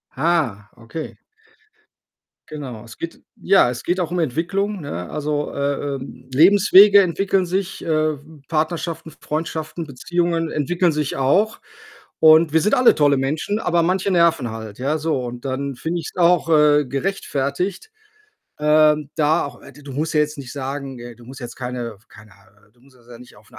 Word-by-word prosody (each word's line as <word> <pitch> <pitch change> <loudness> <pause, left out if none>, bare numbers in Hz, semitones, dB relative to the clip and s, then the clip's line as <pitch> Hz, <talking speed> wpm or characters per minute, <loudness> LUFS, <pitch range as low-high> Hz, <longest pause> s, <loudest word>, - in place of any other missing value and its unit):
Ah, 135 -10 0
okay. 120 +8 -8 1.3
Genau. 130 -8 -7
Es 115 -2 -13
geht 165 - -7 0.2
ja, 190 -9 +4
es 125 0 -5
geht 180 +2 -1
auch 170 -3 -1
um 180 - -3
Entwicklung, 180 +7 -1
ne? 90 - -6
Also, 150 -1 -2
äh 140 0 -1 0.2
ähm, 130 -1 -11
Lebenswege 200 +5 +7
entwickeln 190 +1 0
sich, 190 +1 -3
äh, - - -7
w 155 -1 -2
Partnerschaften, 160 +1 -2
Freundschaften, 160 +1 -4
Beziehungen 165 +4 -1
entwickeln 170 +4 0
sich 150 -2 -2
auch. 195 +12 +1 0.6
Und 160 0 +6
wir 160 - +4
sind 210 - +1
alle 250 -1 +5
tolle 145 -2 +3
Menschen, 155 +10 -2
aber 170 -5 +1
manche 185 +3 0
nerven 165 -8 +2
halt, 110 -1 -8
ja. 140 +5 0
So, 155 -4 -1
und 120 +1 -7
dann 135 +1 -3
finde 165 +7 -3
ich's 155 - -9
auch, 175 -1 +3
äh, 150 -2 +4
gerechtfertigt, 150 - -3 0.7
ähm, 150 -1 +3
da 155 0 +2
auch - - -12
äh, - - -13
du 145 - -16
du 140 -1 -9
musst 150 +4 -2
ja 150 - +4
jetzt 150 0 -1
nicht 130 -2 -8
sagen 135 -1 -5
äh, 120 0 -9
du 120 +1 -17
musst 130 +1 -11
jetzt 120 -1 -8
keine 125 -2 -5
f 110 +4 -30
keine 110 -2 -16 0.4
du 120 - -31
musst 130 0 -23
das 120 -1 -24
ja 120 -1 -12
nicht 125 - -16
auf 105 +1 -21
'ne - - -14
150 Hz, 180 wpm, -21 LUFS, 130-170 Hz, 1.3 s, Lebenswege